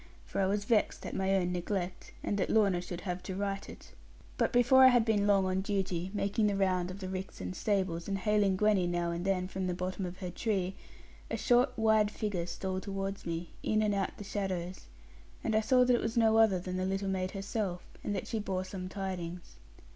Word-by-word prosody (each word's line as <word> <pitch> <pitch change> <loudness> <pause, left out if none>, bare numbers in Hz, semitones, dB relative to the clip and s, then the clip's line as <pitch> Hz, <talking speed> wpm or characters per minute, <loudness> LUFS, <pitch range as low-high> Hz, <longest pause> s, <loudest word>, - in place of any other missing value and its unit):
For - - -2
I 190 - +3
was 205 +1 0
vexed 220 -2 +1
at - - -5
my 190 0 +1
own 180 -2 +1
neglect, 180 0 -3
and - - 0
that 185 - 0
Lorna 200 -5 +3
should 175 -1 -6
have 180 -1 -3
to 185 +1 -5
right 195 0 -3
it. - - -12 0.4
But - - +1
before 245 +2 +6
I - - +11
had 245 -3 +5
been 205 -3 +2
long 195 -2 +4
on 185 0 0
duty, 190 -3 -1
making 205 +1 +1
the 205 - +1
round 185 -2 +1
of 185 - -6
the 185 - -4
ricks 190 0 -5
and 90 0 -5
stables, 185 -5 -1
and 195 -1 -1
hailing 205 0 +2
Gwenny 205 -3 +3
now 175 -1 0
and 170 +1 -3
then 185 -1 0
from 190 0 -3
the 180 - -1
bottom 185 +1 -3
of 175 +1 -8
her 180 -2 -5
tree, 190 -2 -1 0.6
a - - -2
short 245 0 +3
wide 220 -2 +4
figure 205 -5 -3
stole 185 +2 -3
towards 195 -1 -4
me, 170 0 -4
in 215 0 +1
and 210 -1 +2
out 195 -1 -2
the - - -7
shadows, 185 -3 -4 0.6
and 220 - 0
I 220 - +4
saw 250 +3 +4
that 250 0 +4
it - - 0
was 225 +1 -2
no 225 -1 +5
other 220 -4 +5
than 185 +1 -4
the 185 - -1
little 195 +1 -1
maid 185 -1 -1
herself, 195 -2 -3 0.2
and 205 - -2
that 190 - -3
she 225 - -2
bore 190 -3 -2
some 185 -1 -6
tidings. 180 -3 -5
195 Hz, 225 wpm, -31 LUFS, 185-210 Hz, 0.6 s, I